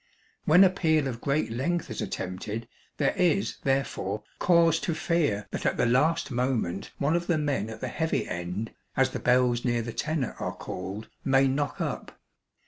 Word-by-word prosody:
When 175 +5 +7
a 185 - +6
peal 160 -6 +2
of 120 -3 -5
great 140 -3 0
length 140 +5 -1
is 110 - -4
attempted 100 +5 -4 0.3
there - - +2
is, 180 +2 +2
therefore, 120 -6 -1 0.2
cause 165 -2 +4
to 170 - -2
fear 150 - 0
that - - -4
at - - +1
the - - +3
last 155 +7 +2
moment 120 -7 -1
one 145 +4 +1
of 175 0 -1
the 170 - +2
men 140 -8 -1
at 110 -1 -8
the 130 - -2
'heavy 160 +6 -1
end,' 90 +6 -4 0.3
as - - +3
the - - -4
bells 125 -1 +3
near 120 -2 +1
the 120 0 -5
tenor 150 -4 -1
are - - -3
called, 95 +4 -6 0.2
may 135 0 +4
knock 145 +2 -1
up. - - -4
135 Hz, 180 wpm, -27 LUFS, 110-160 Hz, 0.3 s, When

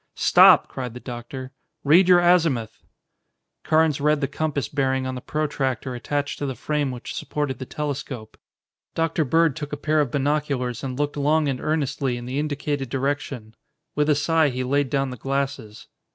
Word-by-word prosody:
"Stop!" - - +6
cried 125 -3 -6
the - - -6
doctor. 125 +2 -7 0.3
"Read 170 +6 +5
your 180 -1 +7
azimuth." 160 -11 +2 0.8
Carnes 155 -2 +2
read 150 0 +3
the 140 - 0
compass 145 -3 -2
bearing 130 -2 0
on 130 - -3
the 125 - -6
protractor 135 -4 -2
attached 145 +4 -3
to 145 - -2
the 130 - -4
frame 150 +3 -1
which 125 -2 -6
supported 145 -4 -3
the 130 - -6
telescope. 140 -6 -5 0.6
Dr. 165 0 +1
Bird 160 +1 +2
took 150 0 -6
a 145 - -3
pair 155 +1 +1
of 145 - -1
binoculars 140 -3 -1
and 130 -2 -4
looked 145 0 -2
long 150 +2 +2
and 135 -2 -2
earnestly 140 -4 -1
in 120 - -7
the 130 +3 -3
indicated 145 -2 -2
direction. 135 -4 -3 0.4
With 150 +1 +1
a 150 - +5
sigh 155 +1 +2
he 130 0 -3
laid 140 +1 +1
down 135 -1 0
the 125 - -7
glasses. 135 -4 -3
140 Hz, 175 wpm, -23 LUFS, 130-150 Hz, 0.8 s, your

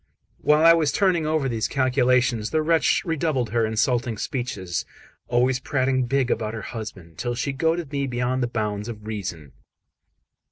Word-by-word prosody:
While 150 +2 +4
I 165 - +9
was 160 -4 +2
turning 175 -3 +2
over 155 -3 +1
these 115 -4 -1
calculations, 125 -4 +2
the 155 -1 +1
wretch 165 +3 +2
redoubled 155 - -1
her 115 -1 +2
insulting 120 +1 0
speeches, 100 -9 -3 0.4
always 125 +2 +2
prating 130 -1 0
big 135 -1 +1
about 110 0 -1
her 110 - -6
husband, 95 -8 -8
till 120 -1 -2
she 135 +3 -2
goaded 160 +1 0
me 140 -1 -1
beyond 125 +1 -1
the 120 - +1
bounds 105 -2 -3
of 105 -2 -8
reason. 90 -9 -5
125 Hz, 160 wpm, -24 LUFS, 110-140 Hz, 0.4 s, I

